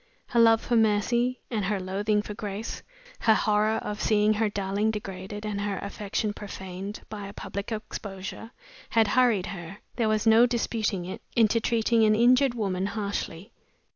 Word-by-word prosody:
Her 235 - +2
love 225 -1 +6
for 240 - 0
Mercy 235 +3 +2
and 215 -4 -1
her 205 0 0
loathing 205 +3 0
for 210 - -6
Grace, 210 0 -5 0.4
her 220 - +4
horror 215 +1 +2
of 210 0 -4
seeing 210 0 +3
her 215 0 +1
darling 200 +1 -1
degraded 205 0 -5
and 205 -1 -2
her 205 -1 -2
affection 205 +1 -3
profaned 195 0 -7
by 205 -2 -7
a 200 - -9
public 200 +2 -6
exposure, 215 -1 -6 0.4
had 225 -2 +3
hurried 240 -7 +3
her 175 -1 -7 0.2
there 225 -3 +2
was 215 0 +1
no 225 +2 +6
disputing 225 -6 -1
it 185 - -6
into 230 0 +4
treating 230 0 +2
an 215 0 +5
injured 250 +3 +4
woman 195 -4 -1
harshly. 200 -1 -4
210 Hz, 165 wpm, -27 LUFS, 200-225 Hz, 0.4 s, love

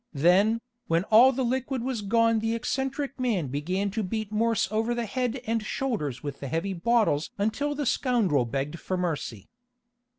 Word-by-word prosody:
Then, 190 +10 +3 0.3
when 165 +1 +2
all 240 +5 +8
the 265 0 -1
liquid 260 0 -1
was 250 -4 -2
gone 230 +2 +3
the 225 +1 -1
eccentric 270 +3 -2
man 210 - 0
began 180 +9 -1
to 220 - -2
beat 215 +2 -3
Morse 225 -1 +1
over 225 +2 0
the 235 -1 -2
head 250 +3 -2
and 225 0 0
shoulders 205 - -3
with 145 -2 -5
the 140 - -5
heavy 165 +7 -2
bottles 195 -5 +1
until 225 +9 -1
the 290 0 -2
scoundrel 225 - +2
begged 140 +6 -3
for 185 - -3
mercy. 155 - -3
220 Hz, 170 wpm, -27 LUFS, 170-240 Hz, 0.3 s, all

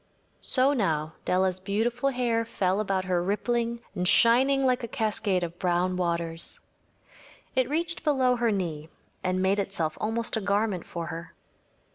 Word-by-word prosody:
So 265 +2 +3
now 160 - 0
Della’s 185 0 +1
beautiful 230 +7 0
hair 240 -3 0
fell 190 -3 0
about 195 -3 -1
her 180 -2 +1
rippling 235 +5 -1
and 180 -2 -1
shining 260 +6 +5
like 255 -1 +2
a - - -2
cascade 210 -4 0
of 170 0 -6
brown 180 0 +1
waters. 170 -2 -2 1.0
It 260 -1 +2
reached 335 +3 -1
below 265 -5 +3
her 235 -1 +2
knee 165 -6 -3 0.3
and 185 0 0
made 195 +2 +2
itself 175 -6 -2
almost 225 +2 0
a 220 - -1
garment 200 -2 0
for 170 -1 -5
her. 165 0 -8
200 Hz, 150 wpm, -27 LUFS, 180-235 Hz, 1.0 s, shining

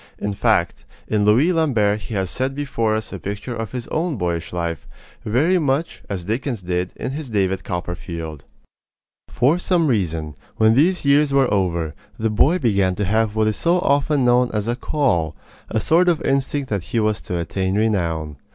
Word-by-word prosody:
In 105 - -3
fact, - - +1 0.2
in 105 -1 +1
Louis 130 +12 +4
Lambert 110 -11 +2
he 110 +1 -6
has 95 -2 -1
set 130 +1 -2
before 115 -6 -1
us 110 -1 -4
a 95 - -5
picture 105 +7 -5
of 115 -2 -5
his 125 -2 -5
own 165 0 -1
boyish 85 -3 -2
life, 85 -1 -3 0.4
very 155 - +2
much 145 +1 -1
as 95 -3 -3
Dickens 115 +2 -3
did 90 0 -2
of - - -3
his 145 +1 -5
in 115 - -11
David 95 -1 +1
Copperfield. 85 -4 -5 0.9
For 140 +9 +2
some 180 -2 +2
reason, 85 - -1 0.2
when 110 0 +5
these 165 +7 +2
years 140 +1 +4
were 135 -4 +3
over, 85 -5 0 0.2
the 110 0 0
boy 145 - +3
began 100 - +1
to 105 - -1
have 110 +2 +1
what 110 0 +2
is 110 -2 0
so 175 +1 +2
often 145 -4 +2
known 125 0 +4
as 105 +1 -1
"a 120 - 0
call" 120 - 0 0.3
a 110 - 0
sort 175 +8 +3
of 165 -3 +2
instinct 135 0 -1
that 100 -5 -1
he 115 - -1
was 110 -1 0
to 90 - -4
attain 95 +3 -2
renown. 85 -9 0
110 Hz, 190 wpm, -21 LUFS, 95-140 Hz, 0.9 s, when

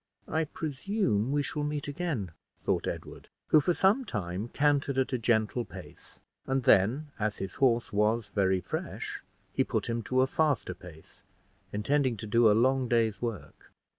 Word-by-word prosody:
"I 160 0 0
presume 145 - -1
we 145 0 +1
shall 150 - -3
meet 150 -1 -3
again," 145 - -3 0.3
thought - - -1
Edward, - - -6 0.2
who 155 - +6
for 170 +4 +1
some 205 +8 +3
time 100 - -4
cantered 140 0 +1
at 130 0 +1
a 125 - +1
gentle 115 +1 +1
pace, - - -11 0.3
and 135 -1 0
then, 125 +11 +3
as 105 -1 -1
his 95 -1 -5
horse 120 -4 +2
was 105 +1 +1
very 95 -2 +2
fresh, - - -5 0.3
he - - +2
put - - -2
him 115 0 -1
to 130 0 +3
a - - +5
faster 140 -8 0
pace, 85 -3 -14 0.5
intending 130 +3 +1
to 105 - -6
do 115 +1 +4
a - - +5
long 130 +2 +3
day's 115 -4 +1
work. 115 -5 -6
120 Hz, 165 wpm, -29 LUFS, 105-145 Hz, 0.5 s, who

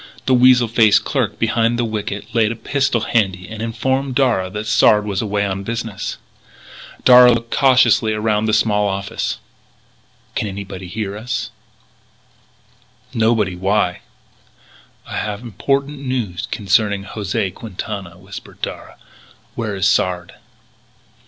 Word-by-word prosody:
The 130 - +2
weasel 125 -1 +5
faced 110 -2 +4
clerk - - -1
behind 115 +1 +1
the 120 - 0
wicket 105 0 -5
laid 115 -2 +2
a - - -4
pistol 130 -1 0
handy 95 -5 0
and 110 0 -7
informed 130 +4 -1
Darragh 115 -9 +1
that 105 +1 -4
Sard 105 -1 +4
was 100 -2 -2
away 105 -2 -1
on 95 -1 -2
a - - -7
business 115 -2 -4 0.8
trip. - - -27
Darragh 125 -1 +8
looked 115 0 -5
cautiously 125 -5 +4
around 105 0 0
the 110 - +1
small 105 -1 +2
office: 100 0 -3 1.0
"Can 110 - -2
anybody 95 -2 -7
hear 100 +1 -4
us?" 120 +3 -4 1.6
"Nobody. 110 -5 +1
Why?" 95 0 0 1.0
"I - - -6
have 105 +1 -3
important 140 +6 -1
news 125 -10 -3
concerning 100 -1 +1
José 100 -3 -3
Quintana," 100 -4 -7
whispered 95 +2 -11
Darragh; - - -6 0.6
"Where 110 -3 -3
is 95 0 +1
Sard?" 90 -4 0
110 Hz, 135 wpm, -19 LUFS, 100-115 Hz, 1.6 s, Darragh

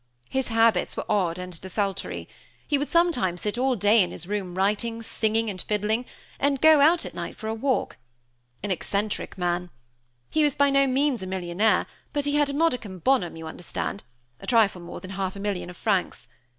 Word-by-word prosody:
His 265 -1 0
habits 225 -4 +2
were - - -3
odd 185 -5 +1
and 180 -2 -6
desultory. 195 +1 -3 0.4
He 290 -2 +2
would 290 - -2
sometimes 270 - +2
sit 210 0 -1
all 260 0 +2
day 210 +1 +5
in 180 - +1
his 175 - -6
room 190 -2 -3
writing, 210 +4 0
singing, 225 0 0
and 190 -3 -3
fiddling, 215 +3 0 0.3
and 280 -1 +2
go 315 +1 +7
out 325 +4 +5
at - - -7
night - - -6
for 220 - -6
a 220 - -1
walk. 255 +4 -1 0.7
An 205 - -2
eccentric 200 +3 -2
man! 175 0 -1 0.6
He 315 - +2
was 295 -2 +3
by 285 0 +4
no 275 0 +4
means 265 -2 +1
a 185 - -5
millionaire, 185 +3 +1 0.3
but 290 -1 0
he 290 - 0
had 290 -1 +3
a - - -3
modicum 250 - 0
bonum, 185 -3 +1
you 165 0 -8
understand 175 +4 -5 0.4
a - - -11
trifle 215 -6 +3
more 175 - -8
than 185 - -8
half 190 -1 -3
a - - -7
million 195 -3 -3
of 175 - -11
francs. 195 - -1
210 Hz, 195 wpm, -26 LUFS, 185-265 Hz, 0.7 s, go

